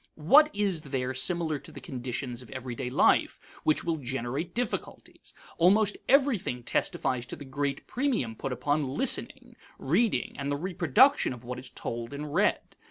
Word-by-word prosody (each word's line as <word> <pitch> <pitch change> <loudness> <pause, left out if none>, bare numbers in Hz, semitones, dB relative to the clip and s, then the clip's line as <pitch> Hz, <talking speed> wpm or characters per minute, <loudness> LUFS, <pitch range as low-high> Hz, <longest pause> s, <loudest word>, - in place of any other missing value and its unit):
What 280 - +6
is 200 -5 -1
there 130 -3 -3
similar 155 +3 0
to - - -12
the - - -9
conditions 125 -1 -5
of 125 - -14
everyday 125 -1 -5
life 125 - +3 0.2
which 155 - +2
will 165 -1 -1
generate 135 +5 -4
difficulties? 245 -1 -5 0.2
Almost 205 +4 +4
everything 250 - +2
testifies 120 +1 -1
to - - -6
the 145 - -10
great 140 +1 -3
premium 235 - -1
put 135 - -4
upon 145 +1 -1
listening, - - 0 0.2
reading, 170 - +1
and 140 0 -2
the 145 - 0
reproduction 180 - +3
of 125 -1 -11
what 125 +1 -5
is 125 0 -7
told 120 +3 -5
and 145 0 -6
read. - - +1
145 Hz, 160 wpm, -28 LUFS, 125-180 Hz, 0.2 s, What